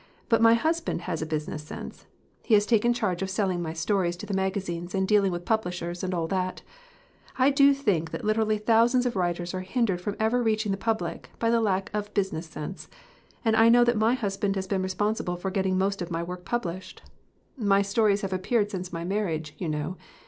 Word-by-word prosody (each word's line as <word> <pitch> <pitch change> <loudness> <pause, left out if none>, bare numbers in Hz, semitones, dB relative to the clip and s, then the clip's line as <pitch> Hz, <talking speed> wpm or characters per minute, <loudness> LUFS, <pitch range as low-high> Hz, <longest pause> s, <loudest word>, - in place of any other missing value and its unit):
"But 230 - +4
my 230 0 +7
husband 325 +7 -1
has 170 -4 -3
a 160 - -3
business 155 -1 -3
sense. 150 - -9 0.3
He 225 - +3
has 205 0 +4
taken 235 +1 +3
charge 210 -7 -1
of 190 - -2
selling 190 -2 0
my 160 -2 -3
stories 175 +1 0
to 195 - -7
the 205 - -4
magazines 190 -2 -2
and 190 0 +1
dealing 200 -2 +3
with 175 0 -5
publishers 180 -5 -2
and 185 - -1
all 175 -2 -1
of 165 - -5
that. 185 -1 -2 0.7
I 265 +2 +4
do 280 0 +6
think 205 - 0
that - - -6
literally 215 0 +2
thousands 230 +4 +3
of 245 - -1
writers 175 -1 -1
are 185 - -2
hindered 190 -2 0
from 205 +2 -3
ever 225 +3 +2
reaching 215 -2 +1
the - - +1
public 225 +1 -2
by 230 0 +1
the 235 0 +3
lack 195 -3 0
of 210 0 -4
business 190 -5 -1
sense. 155 +1 -7 0.6
And 220 -1 +3
I 225 +1 +6
know 240 +1 +7
that 240 0 +2
my 220 +3 +3
husband 200 -4 -1
has 190 -1 -2
been 190 0 -1
responsible 190 0 -1
for 190 +2 -4
getting 190 -1 0
most 195 +1 0
of 175 - -4
my 165 0 -2
work 180 +1 -7
published. 185 -6 -4 0.5
My 200 -6 +3
stories 205 0 +2
have 195 -1 -3
appeared 205 +3 0
since 185 -2 -5
my 165 0 -4
marriage, 170 -5 -2
you 170 - -2
know. 150 +4 -3
195 Hz, 215 wpm, -27 LUFS, 180-220 Hz, 0.7 s, my